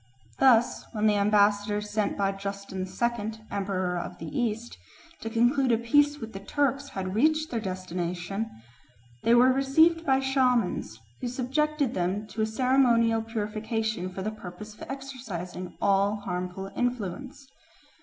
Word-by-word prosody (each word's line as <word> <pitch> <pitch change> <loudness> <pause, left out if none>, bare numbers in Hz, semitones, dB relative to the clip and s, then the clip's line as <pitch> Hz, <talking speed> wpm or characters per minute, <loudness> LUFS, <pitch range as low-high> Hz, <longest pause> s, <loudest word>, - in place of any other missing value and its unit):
Thus, 245 -3 +4
when 215 -1 0
the 215 - +5
ambassadors 205 0 +2
sent 210 -1 0
by 195 -1 +1
Justin 195 -1 -5
II., 220 +2 -1 0.2
Emperor 185 -3 -1
of - - -6
the 160 -2 -7
East, 235 -1 -2 0.4
to 225 - -5
conclude 245 +3 +3
a 230 - +4
peace 290 +6 +3
with 225 -4 -8
the 195 - -6
Turks 280 +6 0
had 185 -1 -4
reached 310 +7 +2
their 235 - -1
destination, 185 +1 -3 0.7
they 235 - +4
were 255 +2 +6
received 320 +5 +4
by 265 -4 +3
shamans, 250 - +1 0.2
who 250 - -3
subjected 270 +2 0
them 185 +4 -1
to 215 +3 -4
a 215 - +2
ceremonial 230 -1 +3
purification 220 -3 -2
for 190 +1 -5
the 215 - -2
purpose 210 0 -9
of - - -20
exorcising 225 -10 -6
all 200 +1 +3
harmful 185 -1 -4
influence. 245 +2 -3
220 Hz, 145 wpm, -27 LUFS, 195-255 Hz, 0.7 s, were